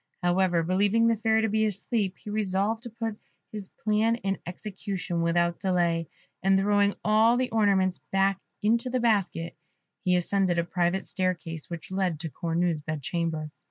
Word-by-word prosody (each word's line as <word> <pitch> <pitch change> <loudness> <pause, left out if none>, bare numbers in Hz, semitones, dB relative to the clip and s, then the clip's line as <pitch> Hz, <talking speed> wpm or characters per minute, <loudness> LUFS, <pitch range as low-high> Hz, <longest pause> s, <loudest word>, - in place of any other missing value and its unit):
However, 175 -1 +2
believing 200 +6 +2
the 230 0 +4
Fairy 220 0 +2
to - - +3
be 220 +1 +1
asleep, 205 -1 -1
he 210 - -8
resolved 210 +1 0
to 240 - -7
put 225 -1 -5 0.3
his 210 -3 -6
plan 215 +3 +1
in 195 -4 -2
execution 185 -2 -4
without 170 +1 +1
delay, 170 -3 +1 0.3
and 195 +1 +4
throwing 205 +1 +3
all 220 +3 +5
the 255 0 0
ornaments 195 -4 +2
back 195 0 +2 0.2
into 235 +4 +2
the 255 0 0
basket, 200 -7 0 0.5
he 180 -2 +3
ascended 180 0 +1
a 170 - +2
private 175 +2 0
staircase 170 -4 -3
which 170 0 -7
led 185 -5 0
to 165 -3 -4
Cornue's 170 0 -1
bed 155 -1 -5
chamber. 160 -1 -2
195 Hz, 160 wpm, -27 LUFS, 175-215 Hz, 0.5 s, all